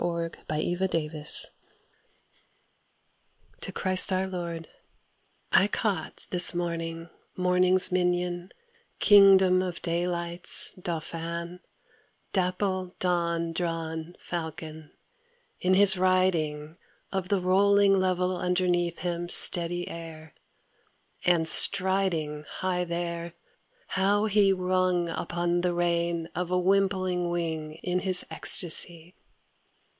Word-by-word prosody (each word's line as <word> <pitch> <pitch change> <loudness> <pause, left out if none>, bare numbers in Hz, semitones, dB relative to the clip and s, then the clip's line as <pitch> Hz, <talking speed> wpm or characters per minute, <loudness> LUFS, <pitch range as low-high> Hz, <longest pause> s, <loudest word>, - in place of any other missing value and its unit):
12 170 -1 -4 0.2
The 155 - -4
Windhover: 160 -2 +1 2.1
To - - -6
Christ 185 0 +3
our 185 0 -1
Lord 170 -3 -7 0.8
I 195 - +3
CAUGHT 200 -6 -4
this 180 -1 +8
morning 165 -1 -5 0.3
morning's 180 0 +3
minion, 180 0 -2 0.5
king 195 -2 +6
dom 185 -1 +1
of 180 -2 -5
daylight's 170 0 +2
dauphin, 170 0 -7 0.7
dapple 185 0 -3
dawn 170 -2 -2
drawn 165 0 -5
Fal 165 -2 -6
con, 155 -1 -12 0.7
in 185 +1 +1
his 190 -1 +6
riding 165 -5 -1 0.4
Of 190 -1 -4
the 200 -2 0
rolling 200 +2 +2
level 185 -1 -1
underneath 180 -1 -2
him 175 -1 -5
steady 175 0 +4
air, 160 -2 -11 0.9
and 170 -2 +1
striding 185 -6 +3
High 180 -1 -3
there, 170 0 -6 0.5
how 200 +3 0
he 205 -2 +2
rung 185 -2 -1
upon 175 +1 -3
the 175 -1 -2
rein 170 -1 -2
of 180 -1 -4
a 180 - -1
wimpling 185 -2 -1
wing 160 -3 -5
In 180 0 -2
his 185 -1 +1
ecstacy! 170 0 +1
175 Hz, 100 wpm, -26 LUFS, 170-185 Hz, 2.1 s, this